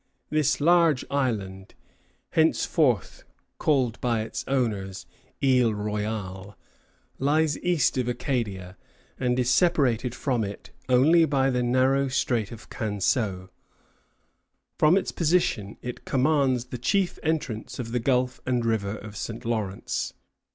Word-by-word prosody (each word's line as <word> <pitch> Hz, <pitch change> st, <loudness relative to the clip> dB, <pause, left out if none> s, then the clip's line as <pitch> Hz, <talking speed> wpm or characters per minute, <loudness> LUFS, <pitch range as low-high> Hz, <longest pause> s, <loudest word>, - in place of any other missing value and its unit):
This 155 Hz, -2 st, +2 dB
large 165 Hz, -3 st, +4 dB
island, 100 Hz, -9 st, -2 dB, 0.6 s
henceforth 155 Hz, -, +1 dB, 0.4 s
called 130 Hz, -6 st, +1 dB
by 120 Hz, -3 st, +1 dB
its 110 Hz, -, -5 dB
owners 105 Hz, -8 st, -1 dB, 0.4 s
Isle 125 Hz, -5 st, +3 dB
Royale, 105 Hz, -2 st, -4 dB, 0.6 s
lies 150 Hz, +2 st, +2 dB
east 175 Hz, -6 st, +1 dB
of 125 Hz, -, -1 dB
Acadia, 105 Hz, -7 st, -3 dB, 0.4 s
and 125 Hz, -1 st, +1 dB
is 125 Hz, -1 st, +1 dB
separated 130 Hz, -6 st, +2 dB
from 125 Hz, -5 st, -1 dB
it 100 Hz, 0 st, -7 dB, 0.2 s
only 155 Hz, +7 st, +5 dB
by 135 Hz, -3 st, +1 dB
the 125 Hz, -1 st, 0 dB
narrow 130 Hz, +3 st, +2 dB
Strait 120 Hz, -5 st, 0 dB
of 115 Hz, -2 st, -10 dB
Canseau. 100 Hz, -2 st, -1 dB, 1.3 s
From 155 Hz, +5 st, +5 dB
its 195 Hz, -, -1 dB
position, 150 Hz, -, 0 dB
it 125 Hz, -1 st, -6 dB
commands 135 Hz, -2 st, +1 dB
the 125 Hz, -1 st, -7 dB
chief 190 Hz, -, 0 dB
entrance 150 Hz, -9 st, -2 dB
of 115 Hz, -3 st, -5 dB
the 125 Hz, -, 0 dB
gulf 125 Hz, +1 st, 0 dB
and 125 Hz, -2 st, 0 dB
river 110 Hz, -3 st, 0 dB
of 105 Hz, -1 st, -10 dB
St. 115 Hz, +3 st, -6 dB
Lawrence. 110 Hz, -4 st, -2 dB
125 Hz, 125 wpm, -26 LUFS, 110-140 Hz, 1.3 s, only